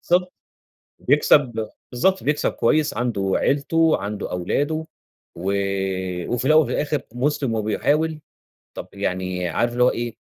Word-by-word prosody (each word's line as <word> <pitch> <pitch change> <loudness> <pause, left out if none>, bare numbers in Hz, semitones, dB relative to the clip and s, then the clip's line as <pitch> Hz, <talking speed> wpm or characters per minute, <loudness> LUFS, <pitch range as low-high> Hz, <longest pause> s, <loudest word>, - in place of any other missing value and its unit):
بالضبط، 180 +1 +3 0.7
بيكسب 130 -5 +3 0.2
بالضبط، 190 +10 +1
بيكسب 150 +1 +1
كويس 150 +5 +1
عنده 105 -5 -1
عيلته، 160 +3 +2
عنده 105 0 -5
أولاده 145 - -1 0.5
وآآ، 95 -1 -2
وفي 125 +2 -1
الأول 155 +3 +6
وفي - - -5
الآخر 150 -1 -1
مسلم 130 -2 0
وبيحاول، 150 +9 0 0.6
طَب - - -7
يعني 90 -1 -2
عارف 120 +6 0
اللي 125 0 +2
هو 125 - +6
إيه، 120 -1 -4
120 Hz, 130 wpm, -22 LUFS, 100-150 Hz, 0.7 s, الأول